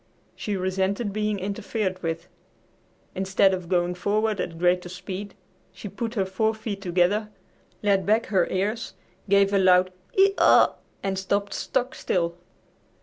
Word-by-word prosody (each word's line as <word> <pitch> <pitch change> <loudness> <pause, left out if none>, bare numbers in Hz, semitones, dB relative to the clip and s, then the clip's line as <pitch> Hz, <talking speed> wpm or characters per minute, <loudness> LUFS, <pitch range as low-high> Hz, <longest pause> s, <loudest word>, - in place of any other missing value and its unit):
She 205 -2 -3
resented 190 +3 -1
being 210 0 -1
interfered 200 -1 -3
with. 165 +1 -3 0.9
Instead 190 0 +2
of 180 -2 -4
going 175 -1 +1
forward 205 +2 0
at 165 -1 -5
greater 180 +1 +1
speed, 190 +2 -7 0.4
she - - -9
put 225 +4 -5
her 195 -3 +1
four 220 +4 0
feet 215 -2 -5
together, 190 +4 +1 0.5
laid 200 -2 +3
back 220 +4 +2
her 190 -4 +2
ears, 210 +5 -2 0.3
gave 200 0 +4
a 200 - +4
loud 185 -1 +4 0.2
"hee 390 +1 +5
haw!" - - +6 0.3
and 190 -1 -1
stopped 200 +1 -1
stock 250 +1 -1
still. 170 -2 -1
195 Hz, 145 wpm, -25 LUFS, 185-210 Hz, 0.9 s, haw